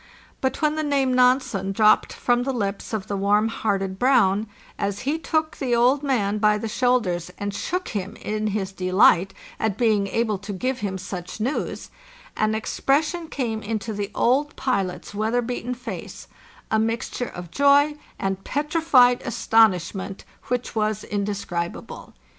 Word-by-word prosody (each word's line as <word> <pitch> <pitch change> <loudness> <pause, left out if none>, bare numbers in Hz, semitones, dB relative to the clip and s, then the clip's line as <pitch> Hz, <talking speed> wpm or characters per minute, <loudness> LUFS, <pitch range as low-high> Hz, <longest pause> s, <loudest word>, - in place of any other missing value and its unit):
But 265 +3 -1
when 305 0 +3
the 310 - -1
name 275 -3 +1
Nansen 250 -6 +2
dropped 215 +1 +4
from 245 0 +1
the 270 +2 -1
lips 200 -4 -3
of 215 -4 -3
the 200 - -3
warm 205 +3 +2
hearted 195 -4 -2
Brown, 220 -5 +3 0.3
as 200 0 -2
he 295 +5 -1
took 315 -1 -1
the 250 -4 0
old 250 +4 +3
man 215 -8 0
by 210 0 +4
the 225 - -4
shoulders 215 -8 +1
and 205 0 -3
shook 365 - -3
him 200 +1 -4
in 215 0 -3
his 195 -2 -2
delight 185 0 +4 0.3
at 220 -3 -1
being 215 -4 +2
able 215 -1 0
to 205 +1 -6
give 255 +6 -2
him 195 -2 -3
such 185 0 -7
news, 250 +7 -3 0.4
an 215 0 +1
expres 275 +7 +1
sion 345 -2 -5
came 235 -8 -3
into 220 +1 -3
the 205 -1 -3
old 280 +5 +2
pilot's 195 -8 -2
weather 220 +4 0
beaten 245 +1 -3
face, 225 -8 -8 0.4
a 220 - +3
mixt 225 +1 -2
ure 245 - -2
of 175 -1 -9
joy 285 - +4 0.2
and 195 0 -2
petrified 290 -4 +3
astonishment, 195 -4 +1 0.2
which 250 0 -2
was 215 -1 -1
inde 205 -1 -2
scribable. 175 -4 -5
220 Hz, 160 wpm, -23 LUFS, 200-255 Hz, 0.4 s, dropped